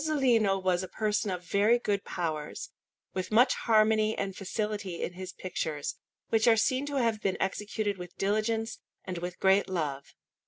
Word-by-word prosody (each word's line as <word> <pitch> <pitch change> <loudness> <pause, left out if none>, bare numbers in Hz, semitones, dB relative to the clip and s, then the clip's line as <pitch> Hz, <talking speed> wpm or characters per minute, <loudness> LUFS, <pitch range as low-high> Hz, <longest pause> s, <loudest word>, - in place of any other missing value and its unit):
Fresco_)] 310 0 0 0.3
Masolino 195 -2 +1
was 180 -1 +2
a 185 - -5
person 210 +1 -1
of 180 -1 -3
very 205 +6 +4
good 205 -4 -1
powers, 155 -4 -4 0.4
with 185 -1 -3
much 245 +4 +5
harmony 215 -1 +3
and 195 -1 -2
facility 205 -2 -3
in 175 - -3
his 185 +1 -7
pictures, 160 -5 -3 0.4
which 225 +1 +3
are 225 -1 +6
seen 255 +5 +1
to 290 - -3
have 230 -5 +1
been 190 - 0
executed 205 0 -2
with 180 -1 -9
diligence 215 +3 0 0.3
and 180 -2 -4
with 180 +1 -5
great 190 +1 +4
love. 145 -6 -3
200 Hz, 170 wpm, -29 LUFS, 180-220 Hz, 0.4 s, are